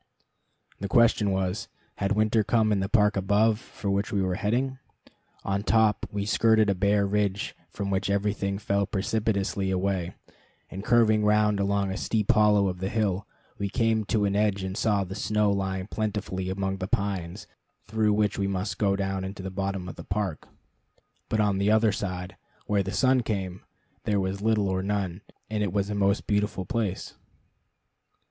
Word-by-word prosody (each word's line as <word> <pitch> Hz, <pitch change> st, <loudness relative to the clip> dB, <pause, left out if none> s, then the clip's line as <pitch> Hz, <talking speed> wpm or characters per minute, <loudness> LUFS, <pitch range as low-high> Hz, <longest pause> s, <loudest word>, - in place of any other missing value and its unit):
The 100 Hz, -, -3 dB
question 115 Hz, -2 st, +4 dB
was, 95 Hz, +2 st, -1 dB, 0.3 s
had 100 Hz, +1 st, 0 dB
winter 110 Hz, +1 st, +2 dB
come 110 Hz, +1 st, +2 dB
in 100 Hz, -, +2 dB
the 95 Hz, 0 st, -2 dB
park 105 Hz, -2 st, +3 dB
above, 105 Hz, +3 st, +2 dB
for 100 Hz, -3 st, -5 dB
which 100 Hz, +1 st, -1 dB
we 100 Hz, -, 0 dB
were 95 Hz, -1 st, 0 dB
heading? 125 Hz, +7 st, -1 dB, 0.6 s
On 100 Hz, 0 st, -1 dB
top, 110 Hz, 0 st, +2 dB
we 100 Hz, -1 st, -2 dB
skirted 110 Hz, -1 st, +3 dB
a -, -, +2 dB
bare 100 Hz, +2 st, +2 dB
ridge 100 Hz, 0 st, -1 dB
from 100 Hz, -1 st, -4 dB
which 95 Hz, +1 st, 0 dB
everything 100 Hz, -1 st, 0 dB
fell 100 Hz, -1 st, 0 dB
precipitously 100 Hz, -1 st, -1 dB
away, 95 Hz, -2 st, -1 dB, 0.6 s
and 95 Hz, +1 st, -6 dB
curving 110 Hz, -3 st, +4 dB
round 105 Hz, -1 st, +3 dB
along 100 Hz, -1 st, 0 dB
a 95 Hz, -, -3 dB
steep 110 Hz, -2 st, +1 dB
hollow 105 Hz, -2 st, +4 dB
of 90 Hz, -1 st, -3 dB
the 95 Hz, +1 st, -2 dB
hill, 100 Hz, -4 st, -1 dB, 0.5 s
came 115 Hz, -2 st, +2 dB
to 105 Hz, 0 st, +1 dB
an 100 Hz, 0 st, 0 dB
edge 100 Hz, -2 st, +1 dB
and 95 Hz, 0 st, -4 dB
saw 105 Hz, -2 st, +1 dB
the 95 Hz, 0 st, -7 dB
snow 105 Hz, 0 st, +1 dB
lying 95 Hz, -1 st, -2 dB
plentifully 105 Hz, -3 st, -3 dB
among 95 Hz, 0 st, -2 dB
the 95 Hz, -1 st, -4 dB
pines 95 Hz, -4 st, -2 dB, 0.4 s
through 110 Hz, 0 st, +1 dB
which 105 Hz, -1 st, +1 dB
we 100 Hz, -, +1 dB
must 100 Hz, +1 st, -3 dB
go 100 Hz, -2 st, +2 dB
down 95 Hz, -1 st, -2 dB
into 95 Hz, 0 st, -6 dB
the 95 Hz, -, -5 dB
bottom 95 Hz, -1 st, -3 dB
of 90 Hz, -, -8 dB
the -, -, -8 dB
park. 95 Hz, -5 st, -3 dB, 0.8 s
But 110 Hz, -, 0 dB
on 100 Hz, -2 st, +2 dB
the 100 Hz, +1 st, +2 dB
other 110 Hz, 0 st, +4 dB
side, 90 Hz, -2 st, -4 dB, 0.3 s
where 105 Hz, -1 st, +1 dB
the 95 Hz, 0 st, -3 dB
sun 130 Hz, +3 st, +3 dB
came, 95 Hz, -5 st, -3 dB, 0.4 s
there 105 Hz, -1 st, +1 dB
was 95 Hz, +1 st, -2 dB
little 110 Hz, -2 st, +2 dB
or 95 Hz, 0 st, 0 dB
none, 100 Hz, -2 st, -2 dB, 0.3 s
and 110 Hz, -1 st, -2 dB
it 100 Hz, -3 st, 0 dB
was 100 Hz, +1 st, -1 dB
a -, -, -1 dB
most 100 Hz, 0 st, +1 dB
beautiful 105 Hz, -2 st, 0 dB
place. 105 Hz, -4 st, -2 dB
100 Hz, 180 wpm, -27 LUFS, 95-105 Hz, 0.8 s, question